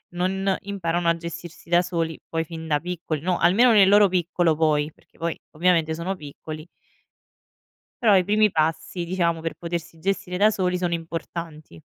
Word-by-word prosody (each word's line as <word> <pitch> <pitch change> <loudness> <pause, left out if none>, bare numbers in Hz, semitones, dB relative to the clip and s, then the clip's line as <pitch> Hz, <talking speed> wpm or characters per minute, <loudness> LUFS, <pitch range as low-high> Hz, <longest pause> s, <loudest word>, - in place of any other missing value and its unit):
non 190 +2 0
imparano 175 -4 -2
a 170 - +4
gestirsi 170 0 -9
da 175 +1 +5
soli 165 -3 -3
poi 165 0 -1
fin 160 -1 -8
da 150 -1 +1
piccoli, 170 -3 -4
no, 180 +2 0
almeno 210 +9 +5
nel 200 -4 +6
loro 205 0 +6
piccolo 175 -2 +1
poi, 150 -1 +2
perché - - -29
poi 165 0 -3
ovviamente 165 -1 +2
sono 170 +4 -3
piccoli. 155 +1 -9 1.4
Però 210 -4 +6
i 180 - +3
primi 210 +2 +3
passi, 160 +2 -1
diciamo, 170 -2 0
per 165 - -3
potersi 170 -1 -6
gestire 185 0 -2
da 210 +3 +5
soli 185 -3 0
sono 175 -1 0
importanti. 165 - -7
170 Hz, 165 wpm, -24 LUFS, 160-185 Hz, 1.4 s, nel